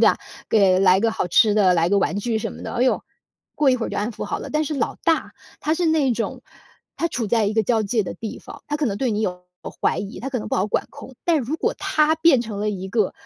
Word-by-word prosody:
对 - - +7
啊？ - - +2 0.3
给 195 -4 +4
来 185 -1 +5
个 225 +3 +2
好 200 - -2
吃 210 +4 +5
的， 195 -4 +4
来 170 +1 +2
个 200 - +4
玩 195 -1 0
具 225 +1 -1
什 - - -4
么 - - -10
的， - - -5
哦 240 - -1
哟， 255 - +2 0.5
过 295 -2 +2
一 255 - +4
会 235 - -3
儿 - - -4
就 - - -3
安 210 +3 -1
抚 225 - -6
好 - - -3
了。 - - -7
但 305 +1 0
是 305 - -3
老 275 -6 -1
大， 325 -1 +1 0.3
他 310 +2 +1
是 355 - -1
那 315 -5 +3
种 225 - -3 0.6
他 335 - 0
处 245 -8 -3
在 225 +1 +2
一 205 - 0
个 220 0 +2
交 225 +1 +1
界 215 +2 0
的 185 - -6
地 225 -2 -6
方， - - -12
他 295 - -2
可 295 - +1
能 200 -4 -1
对 255 +2 0
你 210 -1 -1
有 180 -3 -3 0.2
过 - - -6
怀 - - +2
疑， 200 +1 -6
他 270 - -4
可 255 - -1
能 215 - -6
不 - - -1
好 185 - +1
管 - - 0
控， 265 - -11
但 330 -3 +3
如 275 +6 -3
果 - - 0
他 305 0 +2
变 320 -5 +5
成 215 -3 -6
了 210 - 0
一 190 -2 -5
个 210 -1 +1
225 Hz, 310 characters per minute, -22 LUFS, 200-275 Hz, 0.6 s, 对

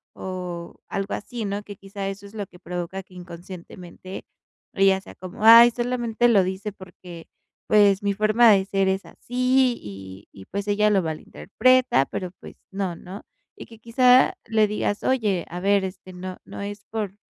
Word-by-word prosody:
o 180 -2 -6
algo 195 +1 -3
así, 235 +2 -6
¿no? 200 0 -3
Que 205 0 -10
quizá, 195 0 -7
eso 195 +1 -7
es 205 - -16
lo 205 -2 -4
que 180 -1 -18
provoca, 180 +2 -5
que 185 -1 -20
inconscientemente, 180 +1 -10 0.5
ella 195 -1 +3
sea - - -14
como: 185 +5 -9
"Ay, 230 +2 +9
solamente 240 -1 0
lo 205 -5 +5
dice 190 +3 -4
porque, 180 -3 -12 0.4
pues, 205 -2 +4
mi 200 0 +1
forma 215 +3 +4
de 195 -2 +3
ser 195 -1 0
es 190 +1 -2
así. 255 0 +1
Y 95 -1 -10
y 95 - -13
pues 200 - -5
ella 210 +1 +2
lo 195 -2 +3
malinterpreta". 205 - +1
Pero, 185 +5 -5
pues - - -12 0.2
no, 190 -3 -3
¿no? 185 +5 -10 0.3
Y - - -10
que 225 -2 -16
quizá, 250 +3 +4
le 220 -1 +2
digas: 205 0 -2
"Oye, 210 -9 0
a 175 - -6
ver, 200 +1 +2
este, 185 0 -7
no 185 0 -7
no - - -9
es 205 0 -7
por 210 -3 -3
195 Hz, 175 wpm, -23 LUFS, 185-215 Hz, 0.5 s, Ay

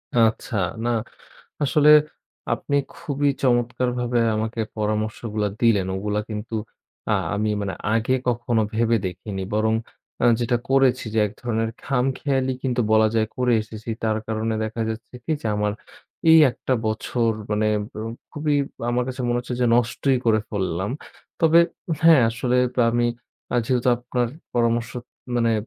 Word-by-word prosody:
আচ্ছা, 115 0 +2 0.3
না - - +1 0.7
আসলে 145 +2 +3 0.7
আপনি 145 - -2 0.2
খুবই 145 -3 -1
চমৎকারভাবে 125 -1 +1 0.2
আমাকে 110 +2 -2 0.2
পরামর্শগুলা 105 0 -1
দিলেন। 110 -6 +3
ওগুলা 105 +2 -1
কিন্তু 110 +2 -5 0.6
আ - - +3 0.2
আমি 105 +1 0
মানে 100 -2 -3 0.2
আগে 115 +3 +1
কখনো 120 -1 +1
ভেবে 115 +1 +2
দেখিনি। 95 +2 -5
বরং 110 +1 +2 0.5
আ - - +4 0.2
যেটা 120 0 +1
করেছি 135 -2 +3
যে, - - +2
এক 100 - -8
ধরনের 115 -2 -1
খামখেয়ালি 135 0 0
কিন্তু 125 -2 0
বলা 110 0 +5
যায় 110 -1 +2
করে 125 -1 +2
এসেছি, 110 +1 -11
তার 110 -1 +1
কারণে 110 0 -1
দেখা 110 +1 -5
যাচ্ছে 115 +2 -6
কি - - -1
যে, - - -3
আমার 105 0 0 0.6
এই 160 - +9
একটা 120 - -3
বছর 115 +2 0 0.2
মানে 105 +1 +1 0.7
খুবই 150 -1 0 0.4
আমার 125 +1 +1
কাছে 130 0 -5
মনে 120 - +1
হচ্ছে 125 0 -5
যে, 125 - +3
নষ্টই 125 +3 +2
করে 110 -1 +4
ফেললাম। 95 -2 -2 0.5
তবে 165 0 +6 0.4
হ্যাঁ, 165 -4 +7
আসলে 120 +2 0 0.3
আমি 120 +1 +2 0.6
যেহেতু 125 0 +1
আপনার 120 0 -2 0.3
পরামর্শ 115 -1 +1 0.5
মানে 115 -1 +2
115 Hz, 140 wpm, -23 LUFS, 110-125 Hz, 0.7 s, এই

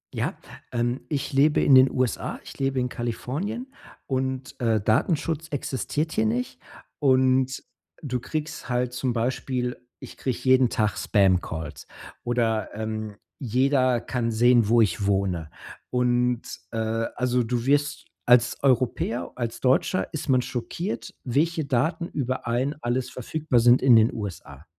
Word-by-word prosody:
Ja, - - -1 0.4
ähm, 120 +2 -1
ich 145 -4 -2
lebe 145 +3 +4
in 140 - +5
den 130 0 +8
USA. 130 -2 -1
Ich - - -12
lebe 135 -1 0
in 125 - 0
Kalifornien 160 - -4 0.3
und, 130 0 -3
äh, 115 -2 +2
Datenschutz 155 - 0
existiert 145 +3 -2
hier 110 -7 +1
nicht. 125 +3 -2 0.4
Und, 130 -1 +3
äh, - - -26 0.4
du 125 -3 -2
kriegst 155 +1 -5
halt 125 0 0
zum 125 0 -1
Beispiel 125 +1 -2 0.2
ich - - -11
kriege 130 -3 -2
jeden 130 -1 +4
Tag 105 -4 0
Spamcalls 90 -5 0 0.4
oder, 115 -3 0
ähm, 110 -1 -4 0.2
jeder 130 0 +2
kann 120 -2 -2
sehen, 120 -1 +4
wo 115 +1 +5
ich 100 -1 +1
wohne. 95 -5 0 0.4
Und 125 -1 +1 0.3
äh, 115 - -4 0.4
also, 125 0 +1
du 120 +1 -2
wirst 145 +1 +1 0.2
als 120 0 +4
Europäer, 125 -2 +1
als 120 -2 -4
Deutscher 130 +8 +2
ist 155 - -4
man 130 -1 +4
schockiert, 125 - -4
welche 160 +6 0
Daten 160 +7 0
über 130 -4 -3
einen 130 +5 0
alles 120 +2 -1
verfügbar 130 0 0
sind 120 +2 +6
in 130 -3 +6
den 110 +1 +5
USA. 85 - -7
125 Hz, 145 wpm, -25 LUFS, 115-135 Hz, 0.4 s, den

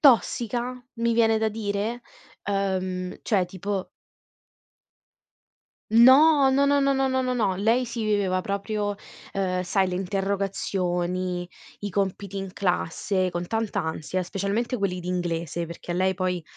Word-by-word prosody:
tossica? 245 -2 +3 0.2
Mi 235 0 +1
viene 225 -1 +4
da 220 0 +1
dire. 215 +2 -3 0.4
Ehm, 185 -2 -2
cioè 190 -5 +2
tipo 190 +1 -4 2.0
No, 270 +5 +7
no, 275 +1 +3
no, 285 0 +3
no, 275 0 +3
no, 270 0 +2
no, 260 0 +1
no, 255 0 0
no. 205 -6 +1
Lei 230 +5 +2
si 230 -1 -4
viveva 200 -3 +1
proprio, 205 +1 -2 0.4
ehm, 185 -2 0
sai 190 +1 +1
le 180 - -3
interrogazioni, 185 -2 -1 0.3
i 205 - -4
compiti 195 0 -2
in 195 -1 -6
classe 185 +1 0
con 175 0 -3
tanta 225 +1 -1
ansia, 160 +3 -2
specialmente 200 +7 -2
quelli 190 -3 -1
di 180 - -6
inglese, 170 -2 -2
perché 170 +1 -6
lei 185 +1 +1
poi, 180 -1 -1
200 Hz, 140 wpm, -25 LUFS, 185-225 Hz, 2.0 s, No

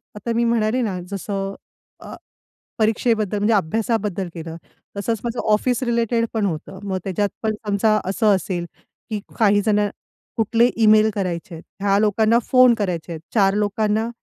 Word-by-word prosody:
आता 230 +3 -3
मी 235 - +2
म्हणाले 230 +1 +1
ना, 200 -6 -2
जसं 195 0 -3 0.5
अ, - - -10 0.7
परीक्षेबद्दल, 220 -1 +1
म्हणजे 210 +2 +2
अभ्यासाबद्दल 205 0 -1
केलं, 165 -1 -7 0.4
तसंच 225 +3 -1
माझं 235 0 -3
ऑफिस 245 +4 +1
रिलेटेड 235 -1 +1
पण 220 -2 0
होतं. 185 +2 -5
मग 195 -2 -2
त्याच्यात 200 +2 0
पण 220 -1 0
समजा 215 +1 +2
असं 200 +2 +2
असेल 180 -1 -3 0.5
की 215 -1 -2 0.2
काही 205 -3 +4
जण, 210 0 +2 0.6
कुठले 230 +2 +3 0.2
ईमेल 215 0 +6
करायचे 180 -3 -3
आहेत, 165 - -9 0.2
ह्या 200 0 +3
लोकांना 215 +2 +3
फोन 255 -2 +6
करायचे 180 -6 -3
आहेत, 160 - -6
चार 195 -3 +4
लोकांना 210 +2 0
210 Hz, 150 wpm, -21 LUFS, 195-225 Hz, 0.7 s, ईमेल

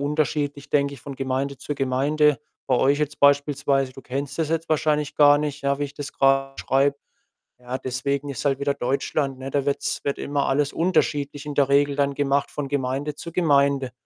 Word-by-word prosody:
unterschiedlich, 145 0 -1
denke 140 -1 +1
ich, 135 - -14
von 140 -1 -7
Gemeinde 135 +1 -2
zu 145 - -4
Gemeinde. 140 +3 +2 0.3
Bei 130 - +2
euch 140 +3 +3
jetzt 150 -1 -3
beispielsweise, 140 -1 +2
du 135 - -11
kennst 140 +3 -5
das 160 -2 0
jetzt 165 0 -2
wahrscheinlich 150 -1 +1
gar 145 -1 +7
nicht, 150 -1 -3
ja, 140 0 0
wie 145 - -1
ich 140 - -7
das 145 -1 -7
grad 135 0 +2
beschreibe. 140 +2 +1 0.6
Ja, 125 +1 -5
deswegen, 140 +2 -2
ist 140 - -5
halt 135 -1 +2
wieder 140 0 +1
Deutschland, 135 +1 -1
ne? 135 +1 -6
Da 140 0 -1
wird's 140 - -1
wird 140 - -1
immer 140 -1 -1
alles 140 +1 +1
unterschiedlich 145 -4 0
in 145 - -4
der 140 -1 +3
Regel 140 +1 +3
dann 140 -1 +1
gemacht 140 0 0
von 140 -2 -4
Gemeinde 140 +1 -2
zu 170 - -8
Gemeinde. 140 -6 +2
140 Hz, 195 wpm, -23 LUFS, 135-145 Hz, 0.6 s, gar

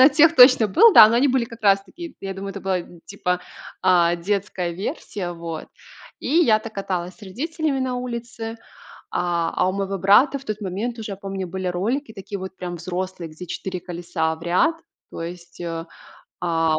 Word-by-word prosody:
на 265 - +10
тех 320 +3 +5
точно 250 -3 +8
был, 435 - +7
да. 215 - +10
Но 230 - +1
они 275 +3 +4
были 255 -2 +2
как 230 -1 -12
раз 195 -1 +4
таки, 335 - -10
я 195 -1 -5
думаю, 195 +1 -5
это 195 0 -7
была, 190 -2 0 0.3
типа, 180 -2 -2 0.4
а, 175 -1 +4
детская 190 -1 -2
версия. 180 0 -4
Вот, 165 -2 -6 0.5
и - - -5
я 285 -8 +4
так 220 0 -9
каталась 185 -2 -3
с 225 - -22
родителями 285 - -2
на 255 -1 -1
улице. 235 -2 -5 0.6
А 170 -2 0
а 185 - +2
у - - 0
моего 195 0 -2
брата, 225 +10 +5
в 270 - -15
тот 215 0 -3
момент, 215 +5 -3
уже 215 -2 -5
я - - -6
помню, 195 -1 -5
были 190 +1 -4
ролики 220 +9 -1
такие, 200 0 -6
вот 190 0 -7
прям 175 -1 -5
взрослые, 180 0 -5
где 160 +4 -9
4 185 +2 -5
колеса 170 -2 -2
в 160 - -18
ряд. 185 - +2 0.4
То - - -7
есть, 170 0 -8
э, 165 -1 -4 0.6
а, 165 -2 +1
195 Hz, 195 wpm, -23 LUFS, 175-235 Hz, 0.6 s, на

